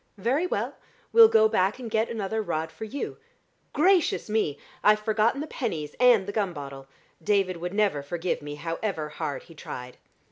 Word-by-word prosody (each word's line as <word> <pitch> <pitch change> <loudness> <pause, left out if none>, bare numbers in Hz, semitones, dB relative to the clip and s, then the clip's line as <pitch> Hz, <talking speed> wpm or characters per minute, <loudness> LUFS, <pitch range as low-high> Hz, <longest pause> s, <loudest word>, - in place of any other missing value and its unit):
"Very 265 - +1
well. - - -2 0.4
We'll 460 -1 +10
go 220 - +5
back 195 0 +1
and 250 -2 -7
get 220 0 0
another 220 -1 -2
rod 160 -5 -3
for 165 +7 -7
you. 270 +6 -5 0.5
Gracious 350 - +2
me! 210 -10 +1 0.3
I've 210 0 +5
forgotten 220 +5 +1
the - - -3
pennies 165 - -4
and 245 -6 +6
the 205 - -4
gum 200 -4 -1
bottle. 140 -2 -8 0.4
David 195 -1 +1
would 175 +3 -5
never 200 -9 +2
forgive 170 +5 -3
me, 145 0 -6
however 165 +1 -3
hard 145 -1 -4
he 165 - -15
tried. 125 -5 -8
200 Hz, 175 wpm, -26 LUFS, 160-225 Hz, 0.5 s, We'll